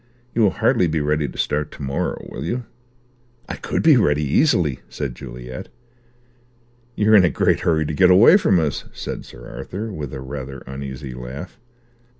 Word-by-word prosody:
You 115 - +1
will 105 - +5
hardly 90 - +3
be 80 0 0
ready 75 0 0
to - - -10
start 75 0 -1
to 70 - -9
morrow, 70 +1 -2
will 65 - -7
you?" 120 +9 -3 0.8
"I - - -4
could - - -2
be 155 -4 +7
ready, 75 -9 +2
easily," 75 - +2
said 70 -4 -4
Juliet. 60 +1 -8 1.3
"You're 105 +1 +3
in 100 -3 +8
a 90 - +4
great - - +2
hurry 80 -2 +1
to 75 - -3
get 90 +4 +5
away 100 - +8
from 95 - +3
us," 75 -3 -2
said - - -6
Sir - - -12
Arthur, 105 +3 -6
with 75 -7 -5
a 65 - -6
rather 70 0 -7
uneasy 65 0 -7
laugh. 65 - -8
75 Hz, 175 wpm, -21 LUFS, 65-90 Hz, 1.3 s, in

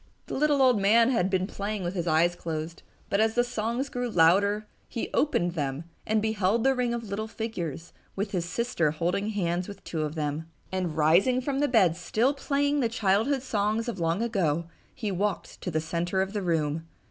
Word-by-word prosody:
The - - -7
little 290 -1 +3
old 250 -6 +4
man 230 +5 +5
had 190 -7 +2
been 190 -1 +1
playing 200 0 -4
with 175 +1 -2
his 175 -3 -3
eyes 170 +2 +3
closed, 165 0 -5 0.3
but 200 - 0
as 220 0 +2
the 245 - +4
songs 240 +3 -2
grew 245 -2 -3
louder 200 +4 +4 0.2
he 235 - -4
opened 175 - +2
them 145 -2 -2 0.2
and 215 0 +2
beheld 220 0 +1
the 270 - +4
ring 250 -2 0
of 235 -1 -2
little 215 +1 -4
figures, 175 -9 -5 0.2
with 200 +1 -2
his 175 -3 -1
sister 175 -3 0
holding 175 +7 -1
hands 180 -4 -1
with 200 - -10
two 160 - -3
of 155 0 -3
them. 155 +1 -3 0.2
And, 180 -4 -2
rising 175 +12 +4
from 270 +1 -2
the 290 - +3
bed, 195 - +4
still 225 - +1
playing 285 +1 0
the 235 -4 +1
childhood 225 +5 +1
songs 215 -1 0
of 230 -6 -4
long 165 +6 0
ago, 170 -8 0 0.3
he 215 -5 -3
walked 200 +2 -2
to - - -3
the 155 -2 0
center 170 +4 -1
of 195 +1 -6
the 205 - -1
room. 160 -2 -1
200 Hz, 200 wpm, -27 LUFS, 170-230 Hz, 0.3 s, man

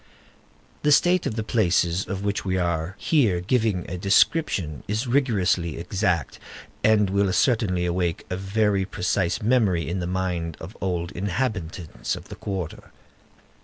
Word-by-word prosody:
The 150 - +2
state 175 +4 +4
of 110 - -3
the 110 - -2
places 90 -5 +1
of 100 0 -4
which 100 0 -1
we 95 -1 -1
are 85 0 -1
here 115 - +2
giving 105 -1 0
a 90 0 -5
description 95 - +2
is 110 +5 -1
rigorously 100 - +1
exact, 90 - -1 0.4
and 105 -2 +4
will 100 0 +1
certainly 95 -5 +2
awaken 90 +1 -1
a - - 0
very 100 +1 +1
precise 90 0 -1
memory 105 -8 +2
in 90 +3 -2
the 85 - -3
mind 90 -3 -2
of 95 +8 -9
old 90 -2 -2
inhabitants 90 -4 -3
of - - -11
the - - -7
quarter. 95 -5 -5
95 Hz, 145 wpm, -24 LUFS, 90-110 Hz, 0.4 s, state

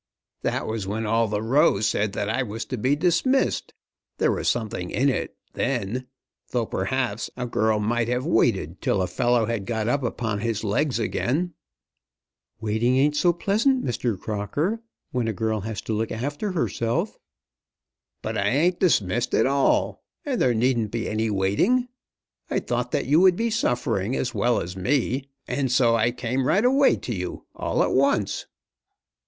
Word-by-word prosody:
"That - - -1
was 110 -3 -3
when 110 +3 -2
all 115 +1 +2
the 105 +1 -2
Row 135 0 +4
said 105 -1 0
that 105 -1 -2
I 115 +5 0
was 115 -1 -4
to 130 - -4
be 130 +6 +2
dismissed. 180 - +1 0.5
There - - +2
was - - 0
something 105 -6 -2
in 140 +3 +2
it, 130 - -3 0.2
then; 125 +6 -2 0.4
though, 120 -2 0
perhaps, 110 +2 -2
a 125 - -2
girl 110 -2 +1
might 115 +2 0
have 125 +2 -1
waited 95 - +1
till 95 - +1
a - - +1
fellow 120 +6 +2
had 110 -4 -3
got 110 -2 -1
up 140 +4 +1
upon 115 -4 -2
his 110 -1 -2
legs 115 +5 +1
again." 145 +9 -1 1.1
"Waiting 110 +4 +1
ain't 145 +2 +3
so 175 +4 +4
pleasant, 220 - +1
Mr. 120 -4 -1
Crocker, 145 - -2 0.3
when 125 -3 -1
a 115 - 0
girl 110 +1 -1
has 105 0 -4
to 110 - -3
look 110 +1 -1
after 145 - -3
herself." 120 -8 -1 1.0
"But - - -2
I 100 - 0
ain't 165 - +2
dismissed 120 - +2
at 110 - +4
all, 135 +1 +1 0.2
and 270 -4 -1
there 125 -2 +3
needn't 115 -2 +1
be 115 +1 -3
any 110 +1 0
waiting. 105 - +2 0.6
I - - 0
thought 120 0 -2
that - - 0
you 145 +5 +4
would 185 -1 +6
be 230 +3 -1
suffering 125 - 0
as 125 - -2
well 120 0 +2
as 90 +2 -6
me, 130 +6 0 0.2
and 135 -3 -1
so 120 -2 +4
I 115 +1 +3
came 125 +2 -2
right 205 +5 +3
away 270 +2 +5
to 120 - -5
you, 90 -3 -5
all - - 0
at - - 0
once." 130 -7 +1
120 Hz, 170 wpm, -24 LUFS, 110-140 Hz, 1.1 s, would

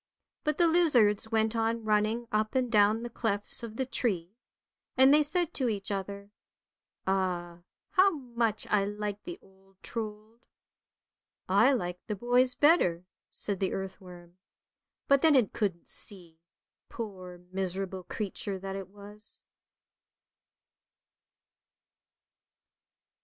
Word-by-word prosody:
But 300 -1 0
the 345 - +5
lizards 245 - +3
went 220 0 +1
on 225 0 0
running 215 +2 +1
up 215 +3 0
and 250 -2 +1
down 215 +1 +4
the 240 - -4
clefts 205 -3 -1
of 230 -2 -7
the 260 - -1
tree; 190 -9 -1 0.7
and 265 +2 +7
they 300 - +6
said 330 +3 -1
to 255 -4 0
each 205 -1 -3
other, 200 +1 -5 0.4
" - - -59
Ah, 180 -3 -1 0.3
how 395 0 +6
much 240 - -2
I 210 -2 +4
liked 205 0 -4
the 350 0 -6
old 195 0 -24
Trold." 220 0 -6 0.6
" - - -61 0.2
I - - +5
liked 180 -7 -3
the 210 - -2
boys 245 +4 +2
better," 245 - +3 0.2
said 200 -3 0
the 190 - 0
earthworm, 185 -2 -8 0.7
but 275 -1 +5
then 315 -3 +5
it 245 -7 +3
couldn't 190 -6 -2
see, 175 -5 -8 0.5
poor, 185 -6 -7
miserable 190 0 -3
creature 195 +1 -4
that 195 +1 -6
it 195 -1 -6
was. 205 +2 -12
210 Hz, 125 wpm, -30 LUFS, 190-240 Hz, 0.7 s, and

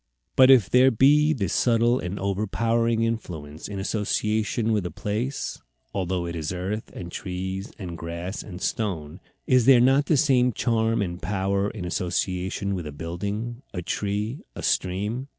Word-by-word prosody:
But 130 0 +7
if 125 -8 +7
there 125 +6 +6
be 145 +6 +5
this 100 - -1
subtle 120 +1 +3
and 90 +2 -4
over 100 +2 -1
powering 115 +3 +1
influence 80 -10 -4
in 100 - -6
association 110 +2 0
with 105 -3 +1
a - - -5
place, 115 +10 -3 0.3
although 90 -2 -1
it 85 0 -4
is 80 -1 -3
earth 95 +4 -4
and 85 -1 -7
trees 95 +2 -4
and 90 -4 -6
grass 85 +4 -5
and 90 -3 -9
stone, 90 -7 -3 0.3
is 125 -2 +3
there 130 -3 +8
not 135 +4 +4
the 155 - +3
same 125 -4 +3
charm 115 -1 +1
and 85 -1 -5
power 100 +1 0
in 100 -5 -6
association 90 +2 -1
with 90 -5 -4
a - - -6
building, 100 - -4
a 90 - -3
tree, 105 - -2 0.2
a - - -7
stream? 105 +8 -1
100 Hz, 165 wpm, -25 LUFS, 90-115 Hz, 0.3 s, there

